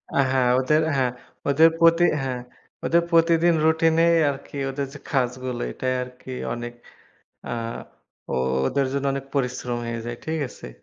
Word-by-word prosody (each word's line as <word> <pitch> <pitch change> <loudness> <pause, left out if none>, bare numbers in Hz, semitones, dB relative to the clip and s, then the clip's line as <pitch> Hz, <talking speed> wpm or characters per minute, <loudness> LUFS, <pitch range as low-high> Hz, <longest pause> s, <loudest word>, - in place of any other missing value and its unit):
আ - - +1
হ্যাঁ। 130 -2 +3
ওদের 150 +4 +3
হ্যাঁ। 130 -2 +1 0.4
ওদের 160 +4 +6
প্রতি 165 +1 +5 0.2
হ্যাঁ 130 -2 -2 0.4
।ওদের 170 +1 +3
প্রতিদিন 165 +1 +4
রুটিনেই 165 +1 +4
আরকি 140 +1 -6
ওদের 140 +1 -3
যে 145 - -9
কাজগুলো 125 -2 -1
এটাই 130 - -2
আরকি 125 +1 -11 0.2
অনেক। 120 0 -6 0.7
আ - - -5 0.8
ও - - -1 0.3
ওদের 140 - +1
জন্য 140 0 -2
অনেক 135 0 -4
পরিশ্রম 125 -2 -1
হয়ে 115 0 -3
যায়, 120 0 -5
ঠিক 160 0 -2
আছে? - - -11
135 Hz, 150 wpm, -24 LUFS, 125-160 Hz, 0.8 s, ওদের